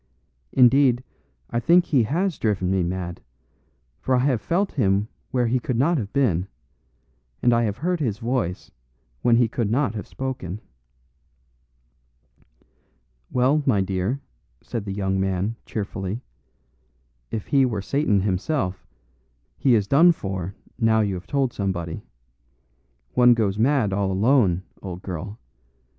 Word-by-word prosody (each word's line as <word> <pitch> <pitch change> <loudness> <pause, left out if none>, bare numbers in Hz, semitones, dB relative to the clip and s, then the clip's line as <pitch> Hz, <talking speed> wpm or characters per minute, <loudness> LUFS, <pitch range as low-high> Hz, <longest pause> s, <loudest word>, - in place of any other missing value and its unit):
Indeed, 130 -1 +5 0.5
I 120 - 0
think 175 +8 +4
he 140 -6 +3
has 170 - -1
driven 95 -4 0
me 95 -1 +2
mad; 90 0 -3 0.8
for 130 - +1
I - - +3
have 130 -6 +1
felt 190 - 0
him 100 -5 +1 0.2
where 125 -2 +1
he 125 +2 +1
could 125 0 -2
not 155 +5 +2
have 100 -4 -5
been, 100 - +1 1.0
and 120 - +5
I 115 0 +3
have 105 -1 -2
heard 180 +2 -1
his 115 -9 -1
voice 115 -6 -2 0.5
when 120 -1 +4
he 120 0 +4
could 115 -1 -2
not 125 -1 +1
have 105 - -6
spoken." 125 -8 -5 2.7
"Well, 130 +5 +2
my 110 -7 +4
dear," 95 +7 -1 0.4
said 115 -3 -5
the 100 - -4
young 95 -1 -1
man, 95 +3 -1
cheerfully, 100 +1 -4 1.1
"if 110 - -4
he 140 -1 +3
were 115 -5 0
Satan 110 -6 +1
himself, 95 - -2 0.7
he 130 -4 +3
is 105 -3 +2
done 170 - +6
for 95 - -5 0.2
now 110 -1 +3
you 100 -2 0
have 90 -1 -7
told 135 -3 0
somebody. 85 -5 -3 1.1
One 125 -1 +6
goes 105 -3 0
mad 120 -5 +2
all 100 -1 0
alone, 100 -3 +3 0.2
old 90 -1 -7
girl. 95 +4 -6
110 Hz, 140 wpm, -24 LUFS, 95-130 Hz, 2.7 s, done